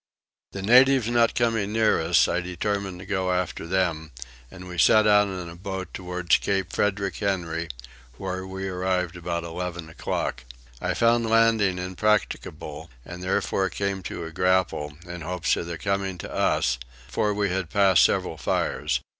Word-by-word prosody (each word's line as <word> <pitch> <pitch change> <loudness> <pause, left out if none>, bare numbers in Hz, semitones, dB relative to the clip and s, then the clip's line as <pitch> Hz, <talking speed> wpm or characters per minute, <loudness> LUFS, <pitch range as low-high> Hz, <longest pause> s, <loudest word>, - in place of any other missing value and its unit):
The 100 - -5
natives 130 +2 +6
not 120 -1 +3
coming 115 -4 +1
near 110 -5 +3
us, 85 +2 +4
I 90 - 0
determined 95 +1 -3
to 90 - -10
go 95 -2 -1
after 90 -2 -2
them, 85 -5 -1 0.4
and 90 -1 -11
we 90 -1 -6
set 110 +5 +6
out 105 -1 +5
in 90 -3 -5
a 85 - -9
boat 95 +1 -6
towards 90 -1 +1
Cape 95 -3 -2
Frederick 100 -1 0
Henry, 85 -5 -2 0.5
where 95 0 -4
we 95 0 -5
arrived 90 -1 -1
about 85 -1 -3
eleven 85 -1 -5
o'clock. 80 - -3 0.4
I - - -1
found 115 0 +3
landing 115 -4 +3
impracticable 90 -5 -2 0.2
and 90 0 -8
therefore 95 +1 0
came 100 -1 -2
to - - -5
a 80 - -7
grapnel, 90 -5 0
in 90 -1 -7
hopes 85 +1 0
of 85 - -4
their 85 -1 -4
coming 100 0 -2
to - - -8
us, - - +1 0.3
for 105 - 0
we 100 -1 0
had 95 -3 -2
passed 95 -2 +5
several - - +1
fires. - - -1
95 Hz, 165 wpm, -25 LUFS, 90-100 Hz, 0.5 s, natives